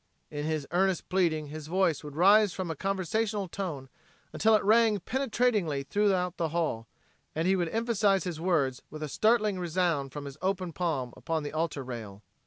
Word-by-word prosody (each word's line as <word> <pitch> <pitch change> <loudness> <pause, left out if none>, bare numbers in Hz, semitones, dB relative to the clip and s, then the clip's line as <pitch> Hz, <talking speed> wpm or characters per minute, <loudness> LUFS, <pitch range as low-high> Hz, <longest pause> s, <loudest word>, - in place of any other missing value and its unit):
In 145 0 -4
his 155 -2 -1
earnest 190 0 +1
pleading 165 -5 +1
his 155 0 -7
voice 175 -3 +1
would 145 -1 -8
rise 200 +3 +5
from 185 -3 -3
a - - -4
conversational 195 +3 -1
tone 165 -8 -5 0.5
until 220 0 +4
it 210 - +2
rang 220 0 +4
penetratingly 225 - 0
through 205 +8 +1
the 180 -3 0
hall, 150 -9 -2 0.5
and 160 +3 0
he 190 - +4
would 175 -3 0
emphasize 215 -3 +1
his 170 -3 -5
words 140 -8 +1
with 155 +1 -7
a - - -2
startling 215 - +2
resound 170 -5 0
from 145 0 -7
his 140 0 -8
open 185 -2 -1
palm 150 -9 -2
upon 160 -2 -2
the 145 - -5
altar 155 -3 -2
rail. 110 -5 -8
175 Hz, 180 wpm, -29 LUFS, 150-195 Hz, 0.5 s, rise